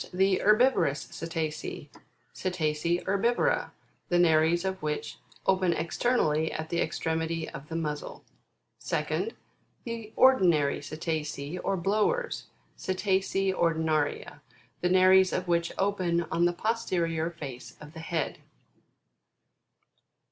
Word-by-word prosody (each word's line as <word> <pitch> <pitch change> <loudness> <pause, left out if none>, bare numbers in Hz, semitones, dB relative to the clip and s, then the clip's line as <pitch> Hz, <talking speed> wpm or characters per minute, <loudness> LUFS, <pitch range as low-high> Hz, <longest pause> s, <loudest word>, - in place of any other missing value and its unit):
The 190 +1 +2
HERBIVOROUS 215 - +3
CETACEA, 160 -2 -4 0.4
Cetacea 170 -1 -1
Herbiuora, 215 +5 +1 0.4
the 175 - +3
nares 170 +1 +4
of 190 0 -2
which 150 -1 -3 0.3
open 185 -2 +3
externally 160 -2 +1
at 155 0 -5
the 170 - 0
extremity 160 0 -2
of 135 +2 -9
the 165 - -5
muzzle; 150 -3 -4 0.6
2d. 455 - -1 0.5
The 230 -2 -6
ORDINARY 175 - +4
CETACEA, 155 +1 -4
or 195 - 0
BLOWERS, 215 - 0 0.3
Cetacea 190 0 0
Ordinaria, 160 -4 0 0.4
the 180 - +1
nares 185 0 +6
of 185 0 -2
which 170 0 +1
open 185 -4 +1
on 170 +1 +2
the 175 - +2
posterior 170 -6 -1
face 140 -7 -9
of 150 +1 -12
the 160 - -9
head. 160 -2 -3
170 Hz, 110 wpm, -28 LUFS, 160-190 Hz, 0.6 s, nares